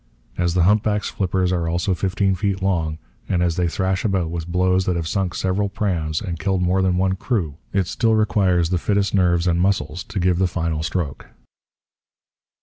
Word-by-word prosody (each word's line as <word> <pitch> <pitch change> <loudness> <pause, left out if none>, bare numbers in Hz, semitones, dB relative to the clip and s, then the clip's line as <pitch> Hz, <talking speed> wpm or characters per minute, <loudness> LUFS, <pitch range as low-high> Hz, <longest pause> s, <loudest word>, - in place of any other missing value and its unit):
As 85 0 0
the 90 - +3
humpback's 105 +2 +2
flippers 95 -1 0
are 85 -2 0
also 90 +3 0
fifteen 95 +1 0
feet 95 0 -1
long, 80 -5 0 0.3
and 90 -2 +1
as 85 -2 +1
they 90 0 +1
thrash 95 +2 -1
about 95 -6 0
with 85 -1 -4
blows 90 +1 +1
that 90 - 0
have 85 -2 -2
sunk 95 -1 -1
several 95 +2 0
prams 85 -7 -1
and 85 -5 -4
killed 95 +3 0
more 90 +2 +2
than 90 -1 +1
one 95 0 +1
crew, 90 - -2
it 95 -2 +1
still 115 +4 +1
requires 95 -6 +2
the 90 - +1
fittest 100 +1 0
nerves 90 -3 +2
and 85 -1 +2
muscles 90 -2 0
to 100 - -4
give 90 -1 +2
the 95 - +3
final 85 -3 -2
stroke. 85 -3 -3
90 Hz, 190 wpm, -21 LUFS, 85-95 Hz, 0.3 s, the